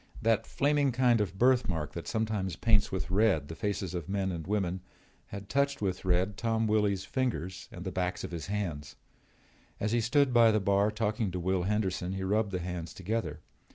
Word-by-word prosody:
That 115 0 +1
flaming 145 -1 +2
kind 120 -2 +3
of 95 -2 -3
birthmark 100 - +2
that 85 - -6
sometimes 105 -5 -1
paints 105 0 +2
with 90 -3 -3
red 95 -8 +2
the 80 - -6
faces 100 -2 -2
of 85 -1 -4
men 95 -1 0
and 85 -2 -5
women 95 -3 -1 0.5
had 100 0 -8
touched 140 +3 +1
with 95 -2 -2
red 95 +2 +1
Tom 115 0 0
Willy's 105 -3 +1
fingers 95 -7 -3
and - - -8
the - - -3
backs 90 +2 -2
of - - -5
his 85 -2 -5
hands. 80 -8 -3 0.8
As 105 - -1
he 120 0 +2
stood 130 +3 +2
by 115 -1 +7
the 110 -1 +3
bar 100 +1 +2
talking 110 -1 -1
to 90 0 -4
Will 95 +1 0
Henderson 95 -3 -1
he 95 0 -3
rubbed 105 +2 +1
the 90 - -1
hands 90 -2 -5
together. 110 +5 -3
100 Hz, 190 wpm, -30 LUFS, 90-110 Hz, 0.8 s, by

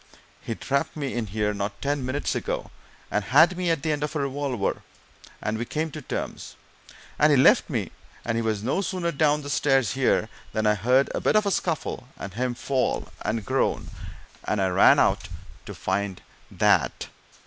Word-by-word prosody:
He 115 - -4
trapped 140 +6 -1
me 140 -3 -3
in 120 -2 -2
here, 105 +1 -1
not 100 0 -4
ten 145 -1 -1
minutes 130 +3 -1
ago, - - -3 0.4
and 105 - 0
had 160 - +5
me 180 -1 -1
at 165 -4 0
the 160 - +1
end 145 -1 -1
of 150 +1 -3
a - - 0
revolver, 135 -6 -2 0.6
and 110 +1 -1
we - - -1
came 155 +5 -2
to 155 - -7
terms, - - -5 0.6
and - - +6
he - - +5
left - - +5
me - - -2 0.3
and 115 - -1
he 115 - +1
was 110 -2 -1
no 135 - 0
sooner 180 -3 -2
down 150 0 +2
the 145 - -6
stairs 135 -8 +2
here - - +2 0.3
than 110 0 0
I 105 - +5
heard 125 +6 +2
a - - -2
bit - - +2
of 215 0 +4
a 200 - +1
scuffle, 160 -8 -2
and 100 -2 -7
him 125 +2 -1
fall 130 +1 -1
and 110 0 -2
groan, 130 +3 0 0.5
and 105 - -1
I 95 -1 +2
ran 90 - +6
out - - +2 0.4
to - - -7
find 95 0 -2 0.3
that! - - +2
130 Hz, 190 wpm, -25 LUFS, 105-150 Hz, 0.6 s, and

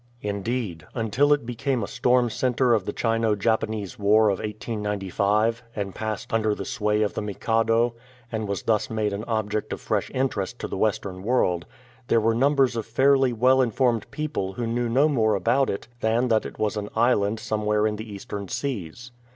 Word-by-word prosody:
In 100 -1 -2
deed, 105 -8 -3
until 125 +5 +2
it 145 -4 +3
became 125 0 -1
a - - -3
storm 125 -1 +2
centre 125 +1 +2
of 105 -5 +1
the - - -2
Chino 115 -2 +1
Japanese 110 -2 -1
War 105 +1 +4
of 95 - 0
1895, 105 0 -1
and 100 -2 -3
passed 110 -1 -4
under 110 -2 +2
the 100 - -6
sway 105 +2 0
of 105 - -1
the - - -3
Mikado, 115 +3 +1 0.4
and 110 -2 -2
was 100 -1 -3
thus 110 -2 +1
made 110 -2 -1
an 100 +2 -4
object 110 -2 -2
of - - -3
fresh - - -1
interest 120 -4 -1
to - - -5
the - - -5
Western 95 -2 -1
world, 95 -6 +1 0.4
there 115 - +4
were 115 +1 +2
numbers 135 +1 +3
of 115 -1 -3
fairly 135 +2 +3
well 130 +3 +4
informed 120 -2 +1
people 150 -11 -3
who 120 +5 -3
knew 120 +1 -1
no 135 +6 +4
more 110 -8 +2
about 120 +8 +2
it 100 - -4
than 115 +3 +1
that 110 -1 +2
it - - -12
was 110 0 -1
an 105 0 -4
island 110 -2 +2
somewhere 105 -1 0
in 105 -1 0
the 110 0 -8
Eastern 100 0 -6
Seas. 120 - -4
110 Hz, 190 wpm, -25 LUFS, 105-120 Hz, 0.4 s, War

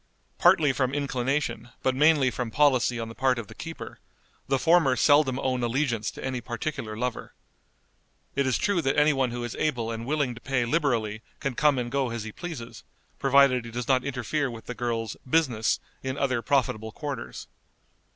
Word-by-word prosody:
Partly 150 -4 +5
from 130 +1 0
inclination, 135 -3 -1
but 130 - +2
mainly 145 -1 +4
from 125 -2 -3
policy 130 -2 +3
on 115 - -3
the 115 - -8
part 130 +1 +1
of 115 - -4
the - - -12
keeper, - - -8 0.5
the 135 - +2
former 160 -3 +4
seldom 145 -2 +4
own 130 -1 -1
allegiance 120 -3 0
to - - -8
any 130 -2 -2
particular 120 -3 -4
lover. 125 +1 -4 1.0
It 140 -1 +1
is 130 - +2
true 200 -4 +1
that 135 -2 0
any 150 +1 +5
one 135 -2 +1
who 120 0 -4
is 120 - -5
able 120 -7 -1
and 115 +1 -5
willing 145 -4 0
to 115 - -12
pay 130 -3 0
liberally 115 -7 0 0.2
can 140 -3 -2
come 145 +2 +3
and 120 -1 -2
go 135 -2 0
as 115 -2 -4
he 110 - -6
pleases, 155 - -8 0.4
provided 135 -2 +4
he 115 - -8
does 120 +1 -4
not 130 -1 +3
interfere 140 +2 -1
with 115 -2 -9
the 125 - -5
girl's 115 -3 -3
"business" 130 -8 +2 0.2
in 130 +1 -3
other 130 -4 0
profitable 110 -3 0
quarters. 135 - -6
130 Hz, 185 wpm, -27 LUFS, 120-140 Hz, 1.0 s, Partly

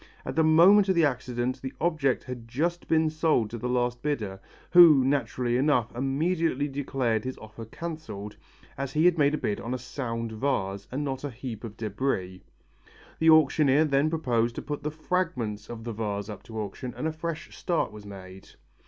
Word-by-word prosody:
At 130 - -4
the 160 - +4
moment 185 +6 +6
of 190 - +3
the 165 -2 +5
accident 125 -2 -2
the 130 0 -6
object 155 -6 +1
had 125 -2 -8
just 170 +9 -2
been 160 -1 +2
sold 155 -9 +1
to 120 - -5
the 125 - -3
last 120 -1 0
bidder, 110 -10 -2 0.3
who 165 -7 +8
naturally 130 -3 0
enough, 125 -5 +1
immediately 145 +3 0
declared 135 -5 -1
his 130 0 -5
offer 110 +1 -10
cancelled, 110 -7 -7 0.4
as 135 -1 -3
he 155 +2 +3
had 175 -2 +4
made 145 +1 +4
a - - -2
bid 105 -7 -2
on 120 +2 -3
a - - -2
sound 115 -2 -4
vase 100 -5 -2
and 140 +3 -2
not 135 -1 -4
a 145 - -2
heap 120 -2 -7
of 110 -2 -8
debris. 100 -4 -2 0.8
The 160 - +4
auctioneer 155 -1 +5
then 140 +1 +2
proposed 120 -8 0
to - - -5
put 145 0 -4
the 150 - -2
fragments 150 - -2
of 115 -1 -7
the 115 0 -4
vase 105 -1 -3
up 105 - -7
to 110 -2 -6
auction 110 +4 -5
and 155 - -1
a - - -1
fresh 160 0 -6
start 175 -3 -1
was 105 -1 -11
made. 95 -2 -11
130 Hz, 190 wpm, -27 LUFS, 115-155 Hz, 0.8 s, who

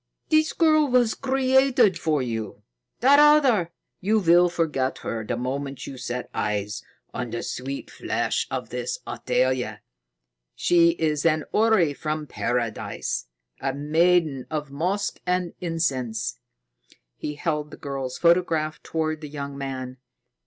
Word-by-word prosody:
"This 310 0 +3
girl 310 -2 +4
was 245 -3 +3
created 265 -5 +3
for 155 -4 +1
you. 115 -4 -5 0.4
That 275 +4 +6
other 275 - +5 0.3
you 215 +4 +2
will 175 -2 +5
forget 150 -6 -1
her 115 -1 -3
the 110 - -3
moment 135 +2 -4
you 135 - -7
set 125 0 -4
eyes 105 -1 -2 0.3
on 125 -1 -4
the 115 +1 -4
sweet 135 +2 -5
flesh - - -1
of - - -4
this 485 - -3
Athalia. 130 -1 -1 0.7
She 170 -1 +4
is 155 -2 0
an 155 -2 +2
houri 210 -9 +3
from 155 +1 -3
Paradise 120 - -2 0.3
a 135 0 -2
maiden 155 -1 +2
of 150 -2 -4
musk 185 +8 -1
and 180 -1 0
incense." 135 -10 -2 0.8
He 150 - -5
held 150 -1 -2
the - - -11
girl's 135 -3 -4
photograph 170 -3 +2
toward 155 -1 -2
the 150 - -7
young 140 -1 -6
man. 130 -2 -5
155 Hz, 130 wpm, -25 LUFS, 130-180 Hz, 0.8 s, That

